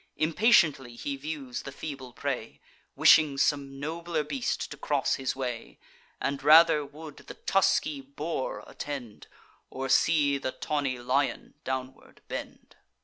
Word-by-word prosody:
Impatiently 155 - +3
he 140 +3 -4
views 135 -3 -5
the 140 - -8
feeble 135 -3 -7
prey, - - -4 0.4
Wishing 150 -3 +6
some 140 -1 0
nobler 165 +1 -2
beast 140 -4 -3
to - - -5
cross - - 0
his 130 -1 -2
way, 125 -3 -5 0.4
And 140 0 -2
rather 155 +1 +7
would 150 +1 -11
the - - -11
tusky 155 -6 +1
boar 140 +1 -4
attend, 130 -7 -7 0.4
Or 135 0 -5
see 145 -2 +3
the 130 - -3
tawny 140 -4 -2
lion 130 +3 -1
downward 130 0 -6
bend. - - -8
140 Hz, 130 wpm, -28 LUFS, 130-155 Hz, 0.4 s, rather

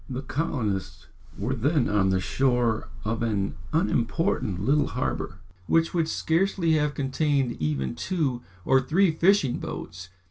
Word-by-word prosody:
The 130 +1 -4
colonists 130 - -2 0.3
were 115 +6 -1
then 140 +3 +1
on 100 -2 +2
the 95 0 +2
shore 120 +1 +1 0.2
of 115 +1 -1
an 105 -4 0 0.2
unimportant 130 - 0
little 145 +2 +3
harbour, - - -3 0.3
which 165 0 +2
would 165 -3 +1
scarcely 170 +1 +1
have 150 -1 +1
contained 140 -1 0
even 70 -4 -1
two 130 - -1 0.2
or 135 0 +4
three 170 +7 +3
fishing 165 -5 +3
boats. 90 +1 -7
130 Hz, 135 wpm, -26 LUFS, 110-160 Hz, 0.3 s, or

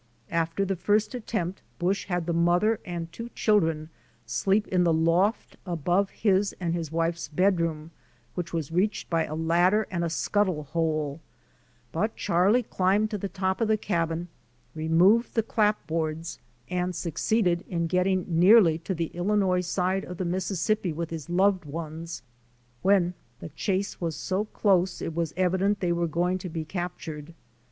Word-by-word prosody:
After 165 +3 0
the 195 0 -1
first 210 +5 +1
attempt 200 -7 -3 0.2
Busch 190 +3 0
had 175 -3 -1
the 170 - -1
mother 175 +6 +3
and 170 -2 -5
two 230 +4 -7
children 165 -7 +2 0.4
sleep 195 - +1
in 180 -1 +3
the 170 - +3
loft 165 +7 +1
above 180 +2 0
his 200 -1 +1
and 170 -2 -1
his 165 -3 -3
wife's 165 +1 -1
bedroom, 165 -1 0 0.4
which 175 -1 -4
was 165 -3 -3
reached 185 +5 0
by 165 -1 +2
a 155 - -5
ladder 175 +6 +3
and 170 -2 -1
a 170 - 0
scuttle 185 -1 0
hole, 155 -1 -1 0.7
but 215 - -1
Charlie 195 +8 +2
climbed 205 +2 +1
to 210 - -2
the 200 - -3
top 190 +3 -1
of 225 - +2
the 220 0 +3
cabin, 170 -4 -1 0.5
removed 170 +9 +3
the 225 - +3
clapboards 165 -8 -1 0.3
and 180 0 -2
succeeded 175 +2 0
in 170 -2 -1
getting 180 +2 +1
nearly 175 0 +6
to 185 +3 -3
the 165 -1 -3
Illinois 185 0 +1
side 185 +2 0
of 180 - -8
the 185 - -2
Mississippi 185 +2 0
with 165 +1 -4
his 160 -1 -6
loved 190 +1 +3
ones 160 0 -6 0.6
when 185 -2 +3 0.3
the - - -7
chase 190 +6 -2
was 165 -2 -2
so 195 +3 -1
close 190 -4 +1
it 165 - -4
was 165 -1 -1
evident 190 +2 +2
they 175 -2 0
were 170 0 0
going 175 +3 0
to 180 - -6
be 160 -1 -4
captured. 165 -3 -6
175 Hz, 160 wpm, -27 LUFS, 165-195 Hz, 0.7 s, nearly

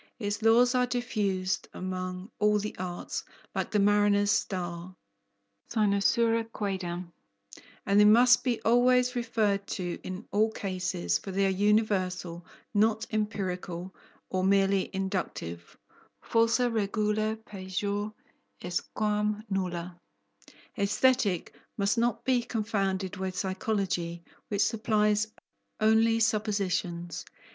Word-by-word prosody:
Its 205 -2 -3
laws 235 +3 +5
are 250 -1 +2
diffused 205 -7 -1
among 185 +1 -5
all 210 0 +4
the 210 +1 -4
arts, 180 -1 -4 0.3
like - - -2
the 210 - 0
mariner's 205 0 +4
star 180 -2 -2 0.8
(cynosura 225 +2 +2
quaedam), 180 -4 -4 0.7
and 200 +1 +4
they 210 - +7
must 245 +4 +6
be 245 -3 0
always 250 +2 +4
referred 210 -4 0
to 175 -2 -4
in 185 +4 -7
all 215 +2 +3
cases, 180 - -2
for - - -9
they 195 +1 +1
are - - +3
universal, 190 -4 +1 0.3
not 220 +1 +2
empirical 190 -4 -3 0.4
or 185 0 0
merely 195 0 +3
inductive 185 - -4 0.4
(falsa 230 +2 +2
regula 215 0 0
pejor 200 +2 -3 0.5
est 175 0 -4
quam 210 0 0
nulla). 180 -2 -3 0.8
Aesthetic 205 -2 +2 0.2
must 200 +2 +1
not 235 0 0
be 255 -1 +3
confounded 195 -4 -2
with 185 -1 -4
Psychology, 185 -3 -2 0.3
which 205 -1 +2
supplies 215 -1 +1 0.5
only 225 +1 +4
suppositions. 190 -6 -1
205 Hz, 110 wpm, -29 LUFS, 185-220 Hz, 0.8 s, they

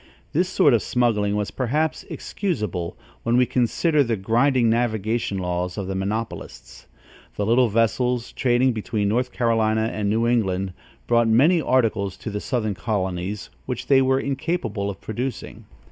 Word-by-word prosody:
This 180 +4 +1
sort 145 -7 +4
of 115 - +3
smuggling 105 -4 +1
was 105 -1 -2
perhaps 150 +7 -1
excusable, 105 - -3 0.2
when 115 +1 +1
we 125 - +5
consider 145 +6 +2
the 115 -3 0
grinding 120 +5 +2
navigation 110 -2 0
laws 90 0 -2
of 100 - -3
the 95 - -3
monopolists. 105 +4 -5 0.5
The 105 - -1
little 120 +2 +4
vessels, 115 +2 +1
trading 125 0 +2
between 105 -2 -1
North 125 +4 0
Carolinia 110 -2 +1
and 105 -1 -2
New 115 +2 +1
England, 95 -6 0 0.3
brought 120 -1 +3
many 150 +10 +4
articles 110 -8 +1
to 110 - -6
the 105 0 -4
southern 110 -5 -1
colonies, 95 - -3 0.2
which - - -4
they 135 -1 +5
were 130 0 +2
incapable 140 - -2
of 100 - -7
producing. 120 +1 -5
115 Hz, 150 wpm, -23 LUFS, 100-125 Hz, 0.5 s, we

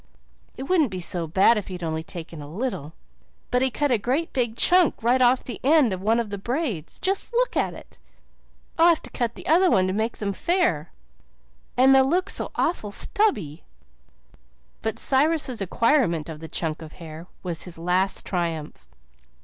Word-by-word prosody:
It 265 - -5
wouldn't 315 -3 +2
be 185 -2 -5
so 170 -1 -2
bad 195 +7 +4
if 205 - -9
he'd 180 -2 -7
only 160 -1 -2
taken 165 -3 -8
a 145 - -9
little, 175 - -4 0.6
but 250 - +2
he 265 - +3
cut 290 +2 -1
a 235 - +3
great 275 - -1
big 240 -4 -1
chunk 360 -3 +5
right 250 +2 +3
off 250 +1 +4
the 240 - -7
end 280 -6 +4
of 185 - -5
one 225 +4 +2
of 225 -3 -3
the 200 - -4
braids. 235 - -3
Just 390 +4 -1
look - - +1
at - - 0
it. - - -15 0.8
I'll 335 - +7
have 335 -2 +3
to - - -10
cut 235 -2 -2
the - - -11
other 355 +4 +4
to 185 - +2
make 220 +3 -2
them 200 -2 -2
fair 195 - 0 0.9
and 265 +2 +6
they'll 265 0 +5
look 360 +4 +1
so - - -1
awful 315 -11 -1
stubby." 200 - 0 1.2
But 220 +1 -3
Cyrus' 275 -4 +1
acquirement 195 - +1
of 155 -1 -7
the 160 - -8
chunk 160 -1 -3
of 155 -1 -10
hair 165 0 -10 0.2
was 175 -3 -2
his 180 -3 -7
last 180 +3 0
triumph. 165 -4 -4
220 Hz, 180 wpm, -24 LUFS, 170-270 Hz, 1.2 s, I'll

